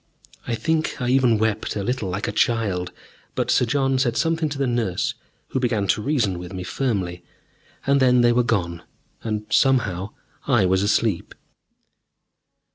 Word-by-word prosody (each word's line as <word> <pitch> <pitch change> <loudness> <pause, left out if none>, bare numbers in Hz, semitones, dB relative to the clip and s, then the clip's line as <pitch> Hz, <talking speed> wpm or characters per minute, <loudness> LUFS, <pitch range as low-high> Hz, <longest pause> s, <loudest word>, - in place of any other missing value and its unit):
I 120 - 0
think 155 +8 -1
I 125 -2 -1
even 125 -3 +4
wept 110 0 -1
a 100 - -2
little, 120 -3 -2
like 95 +3 -3
a - - -1
child, 100 -5 0 0.4
but - - 0
Sir - - +3
John 135 +1 +1
said 125 -3 +1
something 165 -1 +1
to 145 - -5
the 135 - 0
nurse, 120 -7 -1 0.4
who - - -1
began 115 -5 0
to 105 +4 +2
reason 110 -9 0
with 90 +2 -8
me 90 -1 -5
firmly, 95 -6 -2 0.6
and 140 0 +3
then 125 -2 +4
they 120 0 +4
were 125 - +3
gone, 90 -8 -1 0.4
and 105 -1 -3
somehow 105 -8 +2 0.4
I 120 -8 +4
was 95 +1 +2
asleep.... 105 -2 0
115 Hz, 165 wpm, -23 LUFS, 95-130 Hz, 0.6 s, even